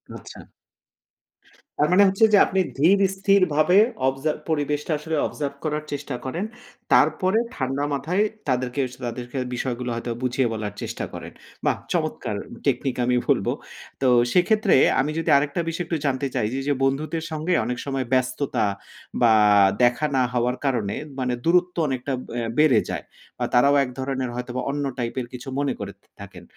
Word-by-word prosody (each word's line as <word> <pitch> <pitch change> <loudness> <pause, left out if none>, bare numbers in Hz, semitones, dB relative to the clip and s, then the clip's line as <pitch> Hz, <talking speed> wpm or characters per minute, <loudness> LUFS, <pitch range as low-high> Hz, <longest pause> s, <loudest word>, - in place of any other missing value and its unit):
আচ্ছা। - - -10 1.4
তার 150 - +3
মানে 200 +3 +6
হচ্ছে, 195 +3 +4
যে 205 - +8
আপনি 190 - -1 0.2
ধীর 175 +8 +4 0.2
স্থিরভাবে 185 -4 +3 0.3
অবজার্ভ 135 +4 -1
পরিবেশটা 150 0 -1
আসলে 160 +1 -3
অবজার্ভ 140 -2 -4
করার 150 -1 -2
চেষ্টা 140 -2 -4
করেন। 170 +10 -3 0.5
তারপরে 190 +3 +3 0.2
ঠান্ডা 135 +1 -2
মাথায় 175 +9 0 0.2
তাদেরকে 130 +1 0
স - - -10
তাদেরকে 120 +2 -5 0.2
বিষয়গুলো 125 0 -3
হয়তো 120 +1 -4
বুঝিয়ে 125 0 +1
বলার 105 -2 -4
চেষ্টা - - -4
করেন। - - -8 0.3
বাহ - - +2 0.2
চমৎকার! - - -2 0.3
টেকনিক 135 -2 0
আমি 125 0 +2
বলব। - - +2 0.5
তো 130 - +3 0.3
সেক্ষেত্রে 210 +3 +3 0.3
আমি 140 +3 +1
যদি 165 - -2
আরেকটা 145 +4 0
বিষয় 165 +2 -3
একটু 165 - -1
জানতে 140 0 0
চাই 105 - +1
যে, 135 - -1
যে 145 - +3
বন্ধুদের 150 +4 -1
সঙ্গে 155 +3 -1
অনেক 125 - -2
সময় 135 -2 -2
ব্যস্ততা, 130 -1 0 0.6
বা 115 -2 +6 0.5
দেখা 120 +5 +3
না 130 - +3
হওয়ার 125 +1 0
কারণে 115 -7 0 0.2
মানে 125 -1 0
দূরত্ব 180 +1 +3
অনেকটা 130 +1 -2 0.2
অ্যা 120 -1 -2
বেড়ে 150 -8 +5
যায়। - - -4 0.3
বা - - -1
তারাও 140 +4 +5
এক 130 - -4
ধরনের 130 -1 -2
হয়তোবা 125 +1 -4
অন্য 145 0 -2
টাইপের 120 +1 -3
কিছু 125 +2 -8
মনে 145 - 0
করে - - -5
থা - - -36 0.2
থাকেন। - - -11
140 Hz, 160 wpm, -23 LUFS, 125-160 Hz, 1.4 s, যে